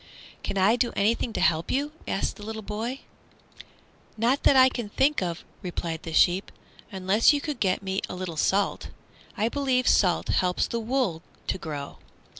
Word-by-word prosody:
"Can 195 - -3
I 200 +5 +4
do 245 -1 +1
anything 225 +3 +1
to - - -2
help 165 -3 +2
you?" 285 +3 0 0.2
asked 195 - -1
the 205 - -10
little 220 +1 -6
boy. 220 +6 -4 1.2
"Not 240 +5 +2
that 280 - +5
I 260 0 +8
think 260 +3 0
of," 175 -2 -3 0.2
replied 170 -3 -4
the 165 - -7
sheep, 180 +4 +3 0.4
"unless 195 +7 +3
you 290 - +1
could 290 -3 -4
get 190 0 +1
me 190 0 -2
a - - -5
little 180 -2 -5
salt. 195 +6 0 0.5
I 215 - +1
believe 260 -1 0
salt 180 -4 +3
helps 180 -1 +1
the 235 - -2
wool 230 -8 -1 0.2
to - - -2
grow." 145 -4 -6
205 Hz, 170 wpm, -26 LUFS, 180-250 Hz, 1.2 s, I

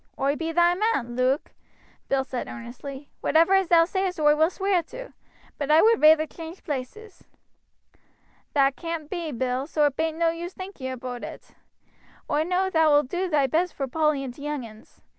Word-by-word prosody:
"Oi 275 +2 +1
be 325 +1 -3
thy 345 +1 +4
man, 355 - -1
Luke," 255 +4 0 0.6
Bill 270 -1 +2
said 255 -2 -5
earnestly. 265 +4 -9
"Whatever 330 +5 +4
as 385 -2 +3
thou 330 -1 +5
sayest 375 -1 -2
oi 295 -1 +5
will 315 +2 +3
sweer 385 -1 0
to; - - -10 0.5
but 285 -1 -3
I 310 +2 +6
would 455 0 +4
reyther 310 0 +6
change 330 +3 -10
places." 320 - -6 1.3
"That 275 -1 +3
caan't 330 -3 -5
be, 340 -4 -3
Bill, 255 +1 -2
so 305 -2 +2
it 285 -2 0
bain't 320 0 -1
no 335 0 +2
use 345 +2 -6
thinking 370 -9 -6
aboot 250 -1 -6
it. - - -9 0.8
Oi 300 - +2
know 365 +3 0
thou 320 -2 +4
wilt 290 -2 +3
do 365 +3 -2
thy 295 -4 +3
best 330 +6 0
vor 275 - -3
Polly 305 0 +1
and 255 -2 -6
t' 280 - -14
young 295 -3 -3
uns. 215 -1 -16
310 Hz, 185 wpm, -25 LUFS, 275-345 Hz, 1.3 s, I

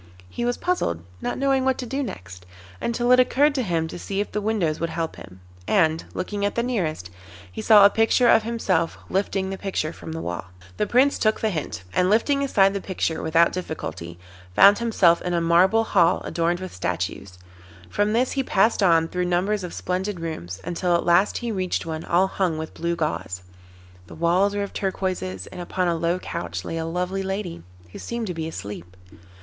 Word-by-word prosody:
He 240 - -3
was 245 0 0
puzzled, 85 - -1 0.2
not - - -2
knowing 270 -1 +2
what 265 -1 +1
to 255 - -4
do 270 +4 -3
next, 95 - -8 0.3
until 240 +1 0
it 250 - +7
occurred 280 +4 +4
to 270 - 0
him 170 -7 -1
to - - -7
see 195 +2 -4
if 205 - -2
the 210 - -2
windows 200 -8 0
would 165 - -1
help 165 0 -3
him, 95 -1 -13 0.3
and, 160 -5 +2
looking 200 +2 -3
at 205 - 0
the 235 - +1
nearest, 165 - -2 0.4
he - - -6
saw 210 -2 +7
a - - +8
picture 225 +2 +3
of 225 - +6
himself 200 -7 -1
lifting 190 0 -1
the 195 - -5
picture 185 -5 -2
from - - -9
the 160 - -4
wall. 85 - -4 0.3
The 210 - 0
Prince 265 +3 +3
took 215 0 +2
the 220 - 0
hint, 145 - -4
and 180 0 +2
lifting 275 +7 +2
aside 195 -8 +3
the 200 - -3
picture 175 -4 -2
without 165 +1 +3
difficulty, 85 - -6 0.4
found 200 +1 +7
himself 200 -7 +3
in 180 -1 -2
a - - +2
marble 180 +7 +4
hall 180 -5 +3
adorned 170 +1 -1
with 185 - -7
statues; 90 +1 -4 0.5
from 205 - 0
this 250 +3 +2
he 275 - 0
passed 220 -3 +2
on 165 -4 +4
through 180 +1 -2
numbers 185 +3 0
of 180 - -5
splendid 185 +1 -3
rooms, 95 - -5
until 175 0 0
at 170 - 0
last 175 +4 +3
he 240 -1 -3
reached 185 -3 -2
one 160 -1 -4
all 175 +3 +3
hung 185 -4 -1
with 160 0 -6
blue 170 +1 -2
gauze. 95 - -3 0.6
The - - -11
walls 180 +5 +2
were 205 - 0
of 200 - -7
turquoises, 185 - -3
and 180 - -7
upon 180 +1 -1
a 170 - +2
low 170 +2 0
couch 90 - -5
lay 165 - -4
a 160 - -2
lovely 180 +3 -2
lady, 190 - -4 0.3
who - - -9
seemed 235 -1 -4
to 180 - -3
be 160 -1 -4
asleep. 100 - -8
180 Hz, 205 wpm, -24 LUFS, 165-210 Hz, 0.6 s, a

